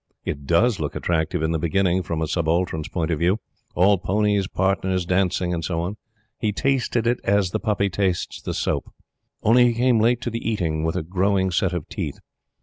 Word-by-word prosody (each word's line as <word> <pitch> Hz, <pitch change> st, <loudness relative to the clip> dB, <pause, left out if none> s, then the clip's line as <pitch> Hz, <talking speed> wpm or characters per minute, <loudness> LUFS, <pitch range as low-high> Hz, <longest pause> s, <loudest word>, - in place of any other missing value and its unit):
It 70 Hz, -1 st, -4 dB
DOES 105 Hz, -, +3 dB
look 75 Hz, -2 st, -3 dB
attractive 80 Hz, -2 st, -1 dB
in 80 Hz, -, +1 dB
the 80 Hz, -, 0 dB
beginning, 95 Hz, +3 st, +1 dB
from 85 Hz, -3 st, -3 dB
a -, -, -1 dB
Subaltern's 80 Hz, -1 st, 0 dB
point 85 Hz, -2 st, -2 dB
of 80 Hz, -, -1 dB
view 90 Hz, +6 st, +2 dB, 0.4 s
all 95 Hz, +2 st, +4 dB
ponies, 100 Hz, +1 st, +1 dB
partners, 95 Hz, -1 st, 0 dB
dancing, 90 Hz, -1 st, +1 dB
and 85 Hz, -1 st, -3 dB
so 85 Hz, +1 st, -2 dB
on. 90 Hz, +5 st, -3 dB, 0.4 s
He 110 Hz, -4 st, 0 dB
tasted 125 Hz, 0 st, 0 dB
it 120 Hz, +1 st, +1 dB
as 100 Hz, -2 st, +2 dB
the -, -, -1 dB
puppy 100 Hz, -2 st, 0 dB
tastes 95 Hz, -2 st, -1 dB
the -, -, -4 dB
soap. -, -, -2 dB, 0.5 s
Only 120 Hz, +3 st, +6 dB
he 120 Hz, -, +3 dB
came 120 Hz, -1 st, +3 dB
late 120 Hz, +2 st, +3 dB
to 120 Hz, -, -3 dB
the 115 Hz, -, -4 dB
eating, 85 Hz, -8 st, -1 dB
with 80 Hz, 0 st, -1 dB
a -, -, -1 dB
growing 95 Hz, +2 st, +1 dB
set 90 Hz, +1 st, +1 dB
of 90 Hz, -4 st, -4 dB
teeth. -, -, -4 dB
95 Hz, 200 wpm, -23 LUFS, 85-105 Hz, 0.5 s, Only